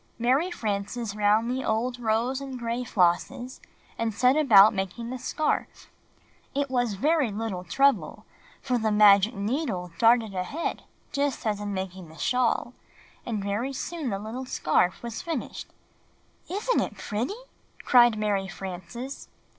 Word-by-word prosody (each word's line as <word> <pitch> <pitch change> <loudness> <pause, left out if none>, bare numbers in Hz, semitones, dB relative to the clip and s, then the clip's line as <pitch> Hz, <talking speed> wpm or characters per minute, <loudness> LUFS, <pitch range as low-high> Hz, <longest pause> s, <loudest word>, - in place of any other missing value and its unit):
Mary 260 +9 +2
Frances 215 - -3
lound 210 +3 +2
the 260 +1 -2
old 240 +3 -1
rose 235 +4 0
and 270 -2 -6
gray 235 +1 -2
flosses, 245 +6 0 0.4
and 230 -1 0
set 250 +5 +4
about 220 -8 +7
making 200 +5 -4
the 255 - -5
scarf. 310 +5 -2 0.6
It 280 -1 -1
was 245 -5 0
very 295 - +2
little 205 -3 -4
trouble, 275 +10 +1 0.4
for 250 -3 0
the 220 -1 0
magic 210 +1 +6
needle 200 - -2
darted 230 -2 +4
ahead 190 - -3 0.3
just 280 -3 -1
as 210 -2 -1
in 205 -1 -3
making 190 -2 -6
the 160 - -14
shawl, 250 +1 0 0.5
and 215 -4 -2
very 215 +7 -2
soon 315 0 -4
the 195 - -2
little 225 +6 -6
scarf 180 -1 +1
was 235 -2 -5
finished. 325 -7 -5 0.8
i - - -5
''Isn't 485 +5 +1
it - - -4
pretty?" 235 - -3 0.5
cried 240 -3 +6
Mary 205 -2 0
Frances. 195 +8 -7
230 Hz, 145 wpm, -26 LUFS, 200-255 Hz, 0.8 s, about